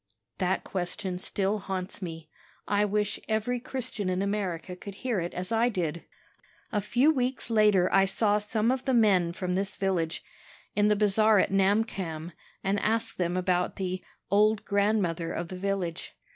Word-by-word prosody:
"That 185 0 0
question 185 0 -3
still 200 +2 0
haunts 190 0 -4
me. 165 -3 -6 0.4
I 205 0 +2
wish 210 0 0
every 220 +3 0
Christian 240 -6 -4
in 185 +1 0
America 190 -4 -2
could 195 +2 -9
hear 240 -2 -1
it 170 0 -3
as 180 +3 -4
I 230 +2 +3
did. 170 -6 -3 0.7
"A 210 - 0
few 255 +9 +3
weeks 255 -3 -1
later 210 -4 +4
I 195 - +6
saw 205 +2 +2
some 215 +2 0
of 260 0 -2
the 265 -2 +2
men 195 -7 +4
from 180 +1 -3
this 195 +1 -2
village, 175 -4 -1 0.5
in 205 0 +4
the 210 - +4
bazaar 215 +1 +4
at 190 - +2
Namkhamm, 195 -5 0 0.3
and 195 +1 +1
asked 225 0 0
them 175 0 0
about 180 -1 0
the 185 -1 -3 0.3
'old 210 +1 +3
grandmother 200 -5 +1
of 170 0 -4
the 185 - -6
village.' 185 -3 -3
195 Hz, 165 wpm, -28 LUFS, 180-215 Hz, 0.7 s, I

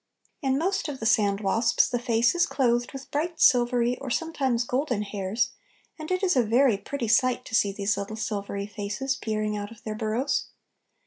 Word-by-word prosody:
In 270 -1 +1
most 370 +1 0
of 280 -3 -5
the 225 - -5
sandwasps 210 +1 +2
the 245 -1 -1
face 235 +1 +2
is 345 -1 +2
clothed 240 -2 +1
with 270 -1 -9
bright 325 +3 -2
silvery, 245 -2 +3
or 270 - -6
sometimes 265 -5 0
golden, 250 -3 -1
hairs, 200 +2 -2 0.5
and 310 - -7
it 370 +1 -1
is 365 -4 +3
a 255 - +5
very 240 +1 +3
pretty 235 +4 -4
sight 255 +3 +2
to - - -11
see 205 -2 +3
these 200 0 -1
little 200 +2 -4
silvery 200 -2 -3
faces 210 +6 -3
peering 215 -3 -2
out 205 0 -4
of 225 -1 -15
their 215 - -4
burrows. 225 +5 -1
235 Hz, 185 wpm, -26 LUFS, 210-270 Hz, 0.5 s, a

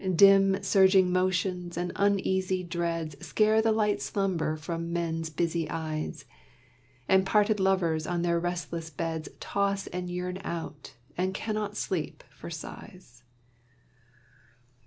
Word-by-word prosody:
Dim 195 +1 +6
surging 190 -2 +5
motions 185 -1 0
and 175 0 -2
uneasy 190 -2 +1
dreads 170 -4 -3
Scare 215 0 +3
the 225 0 +2
light 210 -7 +1
slumber 165 +1 -1
from 165 +2 -4
men's 165 -1 -2
busy 165 0 -1
eyes, 155 -1 -4 0.8
And 190 0 +5
parted 210 +2 +2
lovers 175 -5 +1
on 175 -1 -1
their 170 -1 +2
restless 170 -1 -3
beds 160 +1 -4
Toss 200 0 -1
and 180 0 -5
yearn 180 +1 -3
out, 155 -6 -6 0.2
and 185 +1 0
cannot 210 -1 -3
sleep 170 -5 -3
for - - -10
sighs. 155 -5 -10
180 Hz, 120 wpm, -28 LUFS, 165-195 Hz, 0.8 s, Dim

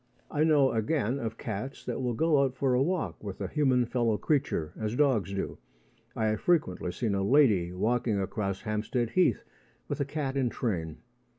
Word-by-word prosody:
I 150 0 +2
know, 150 -4 +4
again, 125 +2 0
of 115 -2 -4
cats 115 +5 -5
that - - -3
will 125 -2 -1
go 155 0 +3
out 130 -2 0
for 130 0 +1
a 125 - +3
walk 175 -3 -1
with 100 -3 -6
a - - -2
human 130 -5 +2
fellow 115 -3 0
creature, 135 - 0
as 110 +1 -3
dogs 125 - +2
do. 100 0 -4 0.6
I 110 -3 0
have 110 - -1
frequently 150 - +1
seen 110 +1 -1
a 100 - 0
lady 100 -7 +4
walking 110 +3 0
across 100 0 -2
Hampstead 110 +3 -1
Heath 180 - +2 0.4
with - - -3
a 140 - +1
cat 140 -1 -3
in 130 -3 +1
train. 85 -11 -3
120 Hz, 185 wpm, -29 LUFS, 105-140 Hz, 0.6 s, know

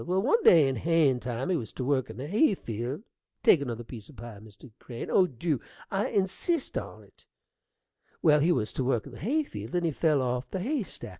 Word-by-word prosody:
Well, 185 +2 0
one 455 - +3
day 160 -5 +7
in 135 -2 -1
hayin' 155 -3 +2
time 125 +7 -3
he - - +2
was 115 -10 -4
to 130 - -4
work 130 -3 0
in 110 - -9
the 130 - -5
hay 210 - +3
field 120 - -5 0.4
take 155 - +6
another 120 -4 -4
piece 110 -2 -10
o' - - -13
pie, 120 -4 -10
Mr. 110 +3 -15
Crane: 120 -2 -7
oh, 185 - +5
dew! 145 0 -2 0.3
I 195 +1 0
insist 205 - -1
on't - - -8 1.0
well, 150 -2 +6
he 160 +5 +3
was 110 -9 -1
to 130 - -1
work 125 -3 0
in - - -10
the - - -11
hay 290 - +1
field, 275 - -7
and 175 -1 +1
he 165 - +1
fell 150 -2 +2
off 125 0 -2
the 190 - -3
hay 275 +6 -1
stack. 195 - -8
145 Hz, 225 wpm, -28 LUFS, 120-180 Hz, 1.0 s, day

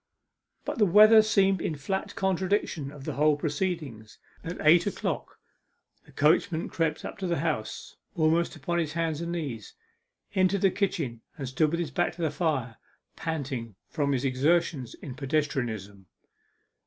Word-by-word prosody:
But - - -3
the 210 - +6
weather 215 +4 +8
seemed 195 -4 +2
in 155 - -2
flat 190 +7 -3
contradiction 190 -6 -1
of 145 -2 -11
the - - -4
whole 150 0 +3
proceeding. 145 - -3 0.4
At 165 +2 -5
eight 170 +3 +5
o'clock - - -3 0.7
the - - -18
coachman 160 +3 +2
crept 160 -2 -1
up - - -7
to 190 - -2
the 170 - 0
House 145 -8 -3 0.2
almost 165 +2 +2
upon 170 +4 -2
his 155 -3 -2
hands 165 -1 -1
and 170 0 -3
knees, 145 -10 -5 0.6
entered 190 0 +2
the 195 - +4
kitchen, 160 - -2 0.2
and 135 - -4
stood 130 +5 +2
with 170 +2 -2
his 165 -5 -3
back - - 0
to 175 - -5
the 155 - +1
fire, 140 -7 -1 0.4
panting 135 - -4 0.2
from 145 -3 0
his 130 0 -1
exertions 135 0 +1
in 135 - -8
pedestrianism. 125 -8 -2
155 Hz, 155 wpm, -28 LUFS, 135-175 Hz, 0.7 s, weather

